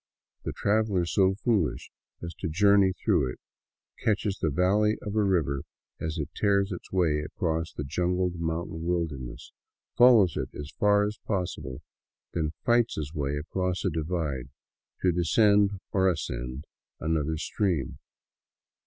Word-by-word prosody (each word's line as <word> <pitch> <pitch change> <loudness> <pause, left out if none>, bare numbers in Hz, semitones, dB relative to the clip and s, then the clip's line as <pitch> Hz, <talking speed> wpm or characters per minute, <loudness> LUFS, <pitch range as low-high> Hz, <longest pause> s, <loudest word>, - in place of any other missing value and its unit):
The - - -1
traveler 100 -4 +1
so 95 +2 +2
foolish 105 -5 0 0.3
as 85 0 -5
to - - -2
journey 100 +3 +4
through 65 -8 +1
it - - -11 0.6
catches 100 -2 0
the 80 - +1
valley 100 +7 +2
of 105 0 -5
a 110 - +3
river 80 -8 +1 0.4
as 80 0 -3
it 75 -2 -3
tears 100 -1 +2
its 90 - -7
way 85 -5 +2
across 80 +1 -2
the 75 - -5
jungled 90 +4 -1
mountain 80 0 -3
wilderness, 80 -8 -3 0.4
follows 115 -9 +6
it - - -2
as 75 +1 -7
far 105 0 +4
as 105 +1 -4
possible, 90 - -3 0.5
then 80 -2 0 0.2
fights 120 -1 +3
his 75 0 -4
way 70 -2 -1
across 90 +5 -2
a 95 - +2
divide, 75 -5 -2 0.5
to 90 - +4
descend 100 +3 +3
or 95 -1 +3
ascend 65 -4 -4 0.3
another 80 0 0
stream. 80 - -1
90 Hz, 140 wpm, -28 LUFS, 75-100 Hz, 0.6 s, follows